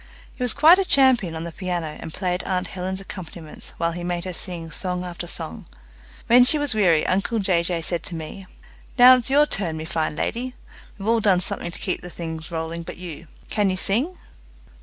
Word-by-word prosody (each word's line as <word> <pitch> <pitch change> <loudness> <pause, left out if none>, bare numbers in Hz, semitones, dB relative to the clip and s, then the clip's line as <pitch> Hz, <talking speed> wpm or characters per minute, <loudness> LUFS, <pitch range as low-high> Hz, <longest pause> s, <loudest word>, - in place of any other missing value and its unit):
He - - -13
was 245 -3 +3
quite 320 +6 +7
a - - +3
champion 260 - +4
on 160 - -4
the 170 - -6
piano, 180 -1 -3
and - - -7
played 180 +1 -2
aunt 185 -1 -2
Helen's 190 0 -4
accompaniments 170 -5 -9
while 170 0 0
he 175 +1 -6
made 175 0 -3
her 185 - -4
sing 165 -1 -5
song 180 0 -2
after 175 0 -6
song. 170 +4 -6 0.6
When 245 +2 +7
she 255 +5 +7
was 290 -4 +1
weary 175 -7 +3
uncle 200 +5 0
Jay 190 -5 +2
Jay 170 -1 -2
said 170 0 0
to 175 - -4
me, 165 +4 -8 0.5
"Now 255 +1 +9
it's 245 0 -2
your 290 +2 +5
turn, 175 - -1
me 155 - -5
fine 160 -2 -2
lady. 250 +8 -3 0.4
We've 200 0 -7
all 230 0 +3
done 195 -4 +3
something 175 -1 -2
to 170 - -6
keep 185 - -3
things 165 -2 -7
rolling 165 0 -4
but 165 - -8
you. 170 -2 -9 0.2
Can 205 -2 +2
you 185 - -1
sing?" 245 - 0
180 Hz, 205 wpm, -23 LUFS, 170-220 Hz, 0.6 s, Now